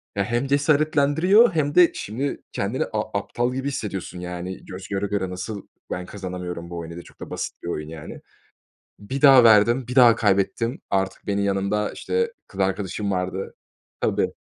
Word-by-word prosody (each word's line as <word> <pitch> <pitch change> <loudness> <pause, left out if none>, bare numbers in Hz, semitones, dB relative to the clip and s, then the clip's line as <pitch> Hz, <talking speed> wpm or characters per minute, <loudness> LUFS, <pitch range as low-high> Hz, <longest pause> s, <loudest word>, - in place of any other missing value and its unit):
Ya, 100 - +1
hem 120 +5 -1
cesaretlendiriyor 155 - +4
hem 145 -2 0
de 180 -1 +7
şimdi 130 +7 -4
kendini 100 +6 -1
a 105 -1 -2
aptal 120 +4 -2
gibi 135 +2 -3
hissediyorsun; 100 -9 -4
yani, 90 +1 -6
göz 95 +1 -8
göre 100 0 -2
göre 95 -2 -2
nasıl 95 +3 -6 0.2
ben 90 - -3
kazanamıyorum 90 -3 -6
bu 85 - -6
oyunu 85 0 -6
diye? 85 - -8
Çok - - -19
da - - -8
basit - - -5
bir - - -6
oyun, 75 -3 -4
yani. 80 -2 -9 0.8
Bir 130 +7 -5
daha 135 -4 +8
verdim, 115 +3 +5
bir 125 - -4
daha 120 -3 +7
kaybettim. 105 +4 +1
Artık 95 0 -1
benim 100 0 0
yanımda, 100 +1 0
işte, 460 0 -1
kız 95 - -8
arkadaşım 95 +1 -1
vardı. 95 +1 -3 0.5
Tabii. - - 0
100 Hz, 170 wpm, -23 LUFS, 95-130 Hz, 0.8 s, daha